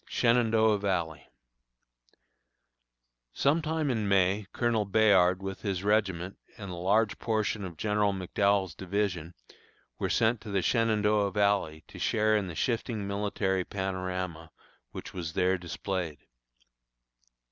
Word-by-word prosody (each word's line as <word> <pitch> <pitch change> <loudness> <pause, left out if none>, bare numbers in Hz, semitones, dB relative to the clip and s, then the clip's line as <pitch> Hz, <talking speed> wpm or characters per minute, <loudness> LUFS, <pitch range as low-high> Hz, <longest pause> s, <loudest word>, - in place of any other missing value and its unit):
SHENANDOAH 115 -3 +3
VALLEY. 85 -8 -2 2.0
Sometime 155 0 +1
in 110 -4 -1
May 100 +1 +2
Colonel 120 -3 +1
Bayard 95 -3 +4
with 95 0 -5
his 95 -3 -2
regiment 100 -3 0 0.2
and 100 -3 -7
a - - -5
large 100 +5 +1
portion 110 -2 -1
of 90 -4 -7
General 105 +2 +1
McDowell's 95 -1 0
division 90 -3 -3 0.6
were - - -1
sent 115 0 +2
to 110 - -9
the 100 -2 0
Shenandoah 105 -3 +2
Valley 100 -6 0
to - - -12
share 110 -1 +2
in 105 -3 0
the 85 - -7
shifting 115 0 -2
military 100 -2 -1
panorama 95 -4 -4 0.4
which - - -8
was 85 -3 -5
there 95 +1 +1
displayed. 85 -2 -4
100 Hz, 120 wpm, -29 LUFS, 90-110 Hz, 2.0 s, Bayard